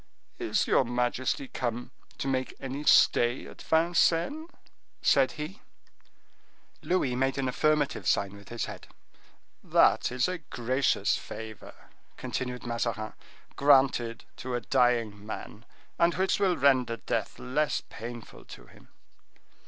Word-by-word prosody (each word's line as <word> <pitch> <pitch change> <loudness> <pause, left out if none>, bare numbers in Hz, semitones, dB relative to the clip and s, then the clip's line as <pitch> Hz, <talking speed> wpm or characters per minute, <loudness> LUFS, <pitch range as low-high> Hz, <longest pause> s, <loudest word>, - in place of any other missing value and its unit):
"Is - - +1
your - - +3
majesty 125 +2 -1
come 120 -1 -4 0.3
to - - -3
make 130 -1 -1
any 135 +2 -5
stay 120 -2 +4
at - - -12
Vincennes?" 170 - +2 0.5
said 135 -1 +4
he. 155 +7 -7 1.2
Louis 145 -9 0
made 135 +2 0
an 135 -1 0
affirmative 150 +2 +1
sign 100 0 +1
with 100 -1 -14
his 120 -1 -3
head. - - -9 0.8
"That - - +3
is 125 0 +1
a 185 -1 -3
gracious 125 - 0
favor," 110 -2 -9 0.4
continued 125 -1 -4
Mazarin, 115 -2 -2 0.4
"granted 130 -5 +3
to 130 -1 -4
a 120 - -2
dying 115 -2 +1
man, 110 +1 -8 0.3
and 170 0 +3
which 190 +1 +1
will 190 -3 +2
render 130 -4 +3
death 95 - -3
less 145 +4 -1
painful 120 0 -9
to - - -12
him." - - -19
130 Hz, 125 wpm, -28 LUFS, 120-145 Hz, 1.2 s, stay